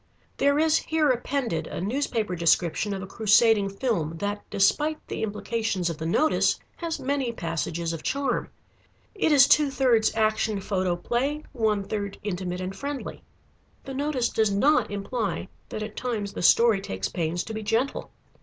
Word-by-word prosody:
There 280 +1 +3
is 315 +1 +4
here 315 -3 +1
appended 245 - -2
a - - -5
newspaper 220 -2 -1
description 170 +3 +2
of 190 - -5
a - - -5
crusading 215 0 +3
film, 195 -7 -2
that, 205 +3 -3
despite 300 +10 +2
the - - -4
implications 210 -4 -1
of 160 - -8
the 160 - -3
notice, 310 - +2 0.2
has 335 -2 -3
many 270 -2 -1
passages 165 -3 -3
of 165 - -5
charm. 275 -3 -1 0.6
It 395 -7 +1
is 275 -3 +7
two 295 -1 +5
thirds 250 -6 +2
Action 215 -1 +1
Photoplay, 205 - -1
one 215 -5 +1
third 200 0 -4
Intimate 180 -2 -3
and 185 +1 -4
friendly. 280 +5 -5 0.6
The 270 - -7
notice 275 -3 0
does 220 -1 +2
not 275 +10 +3
imply 205 0 -3 0.2
that 215 - -4
at 215 0 -7
times 215 -5 -3
the - - -5
story 225 +2 +5
takes 95 - -3
pains 170 - -2
to 220 - -7
be 220 - -4
gentle. 225 +6 -1
220 Hz, 160 wpm, -26 LUFS, 190-265 Hz, 0.6 s, is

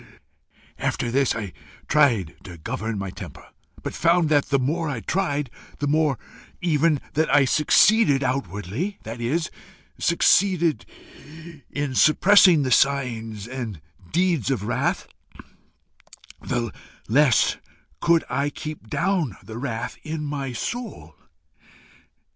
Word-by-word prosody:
After 120 - -1
this 135 -1 +2
I 105 -5 -5 0.3
tried 115 - +2
to 85 -2 -9
govern 110 +7 -4
my 95 -1 -4
temper, - - -10 0.4
but - - -4
found 170 -1 +2
that 145 -2 +3
the 140 - +2
more 155 +5 -1
I 125 -6 -4
tried, 145 - -1 0.3
the 145 - -2
more 150 -2 +2 0.4
even 155 -3 +2
that 160 +1 +1
I 145 -2 +5
succeeded 150 - +4
outwardly, 125 - -3
that 115 +2 -7
is, 155 +7 -1 0.5
succeeded 170 -1 +2 0.8
in 145 -2 -3
suppressing 175 +2 +6
the 130 - -2
signs 115 -6 +1
and 120 -8 -6 0.3
deeds 170 - +1
of 130 -7 -1
wrath, 115 +3 -1 1.3
the 120 -2 -2 0.3
less 135 +1 +3 0.4
could 170 -1 +3
I 140 +3 -1
keep 150 -5 -8
down 175 - -1
the 110 +1 -8
wrath 115 -4 -4
in 155 -1 -5
my 140 -2 -4
soul. 240 - -6
140 Hz, 120 wpm, -23 LUFS, 115-160 Hz, 1.3 s, suppressing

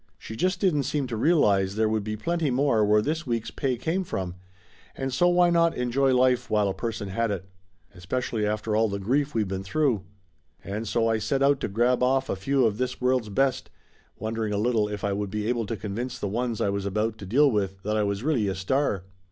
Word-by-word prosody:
She 110 - -9
just 185 - 0
didn't 180 -8 +2
seem 145 -3 -1
to 120 -2 -4
realize 105 - +3
there 110 0 +2
would 110 -1 0
be 110 +1 -4
plenty 165 +3 -1
more 130 -4 +2
where 105 +1 +3
this 160 +3 -2
week's 115 -2 -2
pay 130 -3 -1
came 165 +9 -1
from, 95 - -4 0.6
and 135 -1 -3
so 175 +7 +3
why 175 0 +4
not 170 -1 +3
enjoy 125 +2 +1
life 125 -2 +2
while 105 -2 +2
a 95 - -1
per 115 +3 -3
son 100 -2 -6
had 115 +4 0
it? 95 -3 -3 0.5
Especially 105 +4 -3
after 105 +1 -1
all 110 0 +3
the 100 - -2
grief 135 +8 0
we'd 110 -3 +1
been 95 0 -3
through. 120 +2 0 0.6
And 105 +3 -4
so 115 +1 +1
I 110 -1 +1
set 135 +6 0
out 140 0 +4
to - - -2
grab 120 +5 +1
off 130 +1 +2
a - - 0
few 130 +7 +1
of 110 0 0
this 125 -1 -2
world's 125 -3 +1
best, 130 +5 0 0.5
wondering 110 0 -2
a - - 0
little 110 -1 +1
if 105 -1 -5
I 100 -1 0
would 100 0 -2
be 105 +1 -3
able 115 -1 -1
to 115 - -3
convince 115 +5 -4
the - - -3
ones 115 +2 -2
I - - +2
was 100 0 -2
about 110 +3 -1
to 95 - -8
deal 140 +7 +4
with 95 -3 -2
that 105 +1 -1
I 110 - +2
was 100 +1 -1
really 135 -9 +1
a 95 - -1
star. 100 0 0
115 Hz, 235 wpm, -26 LUFS, 105-135 Hz, 0.6 s, why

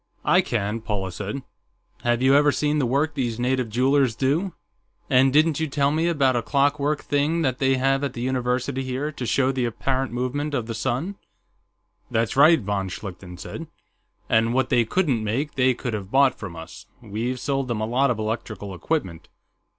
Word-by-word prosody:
"I - - +5
can," 105 +3 -2
Paula 100 -4 -3
said. 105 +9 -5 0.6
"Have 120 +1 +1
you 135 +1 +5
ever 145 +1 +5
seen 150 +1 0
the 130 - +1
work 145 +5 +1
these 120 -3 -2
native 125 -1 0
jewelers 130 +1 +2
do? 155 - 0 0.6
And 130 +1 +5
didn't 155 +1 +3
you 160 - 0
tell 140 0 +1
me 160 +3 +1
about 140 -6 +2
a 120 - +1
clockwork 145 +3 +1
thing 150 +4 +1
they 135 0 +1
have 135 +2 +1
at 140 -3 -2
the 120 - -6
university 130 +1 -1
here, 130 +3 -3
to 130 -4 -6
show 135 +2 +2
the 130 -2 -1
apparent 130 +3 -1
movements 135 +5 -2
of 115 - -3
the 115 - -4
sun...." 130 - -2 0.9
"That's 115 0 0
right," 155 +4 +7
von 100 -3 -2
Schlichten 90 -1 -8
said. - - -7 0.6
"And 115 +2 +2
what 130 - +1
they 120 -1 +3
couldn't 135 - 0
make, 130 +8 -2
they 130 -2 +2
could 125 -1 -4
have 100 -3 -4
bought 135 +2 +4
from 95 -5 -8
us; 80 0 -10 0.2
we've 115 +4 -3
sold 135 0 -1
them 120 -3 -2
a - - 0
lot 130 +5 +2
of 120 - 0
electrical 110 -2 -4
equipment." 95 - -3
130 Hz, 185 wpm, -24 LUFS, 115-140 Hz, 0.9 s, right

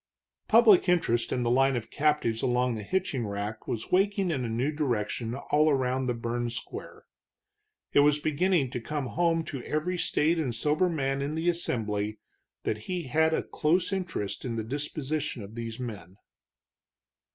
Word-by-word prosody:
Public 215 -5 +6
interest 120 -10 +2
in 125 - 0
the 120 - +1
line 135 +1 +4
of 120 -2 -4
captives 150 -7 +1
along 125 0 +1
the 110 - -4
hitching 135 - -1
rack 100 +2 -5
was 115 -1 -4
waking 195 0 +2
in 135 -5 -1
a 120 - -2
new 120 +6 0
direction 120 -5 -1
all 150 +3 +2
around 130 -2 +1
the 125 - +1
sun 115 - -9
burned 120 0 -2
square. - - -8 0.9
It - - +6
was 145 +1 +5
beginning 155 -1 +1
to 125 - -4
come 145 +3 -3
home 165 +4 +1
to 135 -5 -6
every 175 +4 -1
staid 165 +2 +2
and 130 -7 -1
sober 150 +9 +2
man 135 -4 -1
in 145 +2 -2
the 165 +2 +1
assembly 110 -10 -1 0.5
that 110 - -1
he 180 -2 -1
had 160 +4 +2
a - - -1
close 175 +5 +1
interest 175 - -3
in 120 -3 -3
the 110 - -2
disposition 145 0 -3
of 100 +2 -10
these 115 0 -6
men. 100 -7 -7
135 Hz, 175 wpm, -28 LUFS, 115-160 Hz, 0.9 s, Public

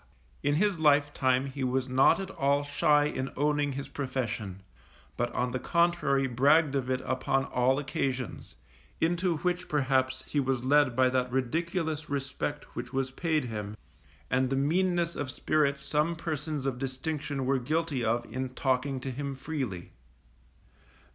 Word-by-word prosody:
In 145 +1 +1
his 195 +1 +2
life 145 -1 +4
time 130 0 +2
he 135 0 -5
was 130 0 0
not 130 +6 +4
at 195 0 -5
all 140 -1 +1
shy 145 +1 +3
in 135 -2 -2
owning 145 0 +1
his 140 +1 -5
profession, 120 -8 -4 0.5
but 120 0 -1
on 125 0 0
the 130 - -2
contrary 170 -5 +2
bragged 140 +4 +4
of 130 -2 -1
it 130 0 0
upon 130 +1 0
all 130 +1 +2
occasions; 130 -3 -3 0.4
into 175 +1 +1
which 180 +2 -2
perhaps 130 -2 +1
he 145 - 0
was 130 -2 0
led 140 -2 +4
by 130 0 +4
that 125 -1 0
ridiculous 160 +4 -1
respect 140 +1 -4
which 120 0 -5
was 135 -1 -1
paid 155 -1 0
him, 105 -2 -5 0.5
and 130 0 +2
the 135 - 0
meanness 170 +4 +1
of 145 - -3
spirit 140 0 +1
some 150 +4 0
persons 155 -3 -3
of 130 -2 -2
distinction 140 +1 -3
were 135 0 +2
guilty 155 0 -1
of 115 +1 +1
in 130 +3 -4
talking 130 0 0
to 135 - -4
him 140 +2 -4
freely. 130 - -4
135 Hz, 155 wpm, -29 LUFS, 130-150 Hz, 0.5 s, life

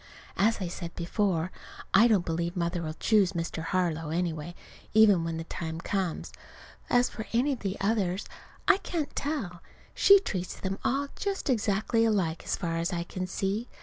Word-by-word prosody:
As 220 +3 +2
I 185 - -2
said 170 0 -6
before, 175 -1 0 0.4
I 220 +5 +7
don't 205 -6 +3
believe 170 +2 -2
Mother'll 170 -2 -2
choose 200 0 +3
Mr. 165 -1 -3
Harlow, 165 -2 -1
anyway, 170 0 -2 0.4
even 205 -6 +6
when 165 -1 -3
the 165 - -4
time 160 0 -5
comes. 185 -1 -2 0.6
As 245 0 +4
for 220 - -7
any 260 +5 +3
of 255 - -6
the 195 0 -3
others 195 -2 0 0.4
I 395 - +7
can't 335 -6 -4
tell. 225 - -3 0.3
She 400 - +7
treats 185 - -4
them 195 +1 -3
all 280 +2 0
just 395 -8 -1
exactly 220 0 +1
alike, 190 -8 +1
as - - -1
far 165 -2 -2
as 170 +3 -1
I 170 -1 -1
can 185 +1 -5
see. 195 +5 -2
190 Hz, 170 wpm, -28 LUFS, 170-220 Hz, 0.6 s, I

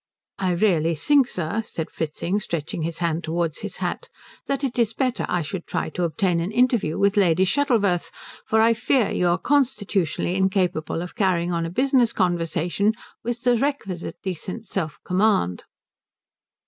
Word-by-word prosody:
"I 185 -2 +1
really 170 -4 +2
think, 275 - +3
sir," 180 +4 -2
said 165 -6 -6
Fritzing 170 +5 -2
stretching 165 -4 -3
his 165 +1 -3
hand 170 0 -1
towards 165 -1 -2
his - - -6
hat, - - -3 0.4
"that 275 0 -1
it 250 -2 -1
is 225 -1 +1
better 255 -3 0
I 180 -2 0
should 170 +3 -6
try - - -2
to 180 - -5
obtain 170 +2 +1
an 170 +4 -2
interview 240 -8 +2
with 200 +1 +2
Lady 185 -2 +4
Shuttleworth, 210 -8 +1 0.4
for 220 - +3
I 225 +1 +5
fear 240 0 +1
you 180 - +1
are 175 +1 +3
constitutionally 200 - 0
incapable 185 -4 0
of 180 - -8
carrying 180 -3 +1
on 165 -1 -1
a - - -5
business 250 +3 +2
conversation 175 +2 +1 0.3
with 240 +1 -3
the 245 -1 +4
requisite 220 - -3
decent 190 +4 -5
self 170 -6 -3
command." 185 - +1
190 Hz, 160 wpm, -23 LUFS, 170-230 Hz, 0.4 s, I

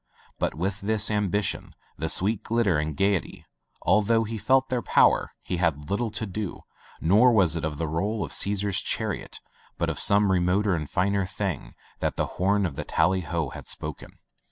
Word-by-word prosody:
But - - -1
with 95 +5 -2
this 110 +1 +1
ambition, 105 -1 -1 0.2
the 80 +2 -3
sweet 100 +5 0
glitter 110 -9 +1
and 75 -1 -3
gayety, 100 -3 0 0.4
al 105 - +5
though 115 +2 +2
he 110 0 -5
felt 130 +5 +3
their 125 -1 0
power, - - +3
he 90 - -3
had 80 -3 -1
little 110 +3 0
to 110 +1 -3
do, 100 -1 -5 0.4
nor 105 +9 +5
was 95 -8 +3
it 85 - -3
of 75 -1 -2
the 80 - -2
roll 100 +7 -1
of - - -7
Caesar's 100 -1 +1
chariot, - - -3 0.4
but - - 0
of - - -4
some 100 -1 +4
remoter 95 +3 +2
and 75 -4 -3
finer 100 +1 +1
thing, 95 -5 -4 0.2
that - - -1
the - - 0 0.2
horn 100 +1 +3
of 85 - -2
the - - -4
tally 95 0 +1
ho 85 -4 -2
had - - -10
spoken. - - -7
100 Hz, 185 wpm, -26 LUFS, 85-105 Hz, 0.4 s, al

